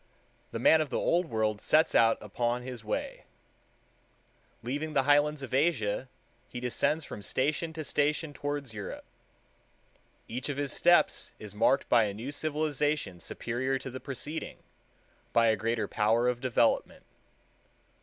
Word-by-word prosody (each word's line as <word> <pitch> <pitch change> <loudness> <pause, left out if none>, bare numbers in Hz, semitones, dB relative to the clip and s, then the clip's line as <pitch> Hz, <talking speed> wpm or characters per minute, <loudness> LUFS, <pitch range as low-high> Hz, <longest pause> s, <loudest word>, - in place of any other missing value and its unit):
The - - -5
man 155 +7 +5
of 155 - -2
the - - -1
Old 175 0 +1
World 110 -4 -1
sets 155 +1 +3
out 115 -1 +5
upon 120 +4 -2
his 125 -3 -7
way. 110 - -4 1.4
Leaving 145 +6 -3
the 135 - +3
highlands 145 +1 +3
of 130 - -7
Asia, 130 -5 +1 0.4
he 125 - -6
descends 145 +5 0
from - - -8
station 145 +8 -1
to 160 0 -5
station 150 +1 0
towards 145 -4 -4
Europe. 105 -2 -7 1.2
Each 125 +5 -4
of 140 - -3
his 145 -1 -2
steps 175 0 +3
is 105 -2 -9
marked 115 +6 +2
by 115 -2 +5
a 100 -1 -4
new 120 +7 -5
civilization 150 - -1
superior 130 +8 -2
to 130 - -7
the 130 - -6
preceding, 145 +5 -5 0.7
by 115 -1 +5
a 110 - +3
greater 110 -1 -1
power 115 +4 +2
of 125 -1 0
development. 120 -2 +1
130 Hz, 145 wpm, -29 LUFS, 115-150 Hz, 1.4 s, man